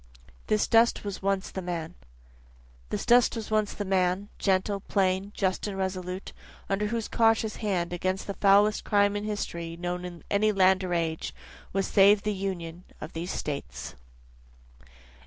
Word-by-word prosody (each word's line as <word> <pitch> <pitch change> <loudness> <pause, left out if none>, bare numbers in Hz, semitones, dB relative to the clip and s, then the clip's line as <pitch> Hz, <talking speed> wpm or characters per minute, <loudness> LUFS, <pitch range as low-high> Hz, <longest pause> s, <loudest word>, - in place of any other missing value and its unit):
This 215 -1 +2
Dust 230 +1 +4
Was 200 -2 -5
Once 195 0 -1
the 190 - -4
Man 175 -2 -4 1.0
This - - -3
dust 245 0 +5
was 225 -1 -6
once 215 -1 +2
the 205 - -4
man, 190 +1 +1
Gentle, 195 +1 +1
plain, 190 0 0
just 190 +1 0
and 195 -2 -4
resolute, 185 0 -4 0.3
under 200 +2 0
whose 230 0 -2
cautious 225 -1 +2
hand, 180 -5 -1
Against 185 +2 -2
the 200 - -4
foulest 205 +2 +4
crime 205 0 +2
in 205 0 -3
history 170 -5 -4
known 180 +1 -3
in 175 -2 -8
any 215 +1 +3
land 190 -1 +4
or 180 -1 -1
age, 160 -1 -2 0.4
Was 195 0 0
saved 200 +1 +5
the 210 - 0
Union 180 -3 -5 0.2
of 155 - -8
these 170 +2 -4
States. 145 -6 -5
195 Hz, 155 wpm, -27 LUFS, 180-205 Hz, 1.0 s, dust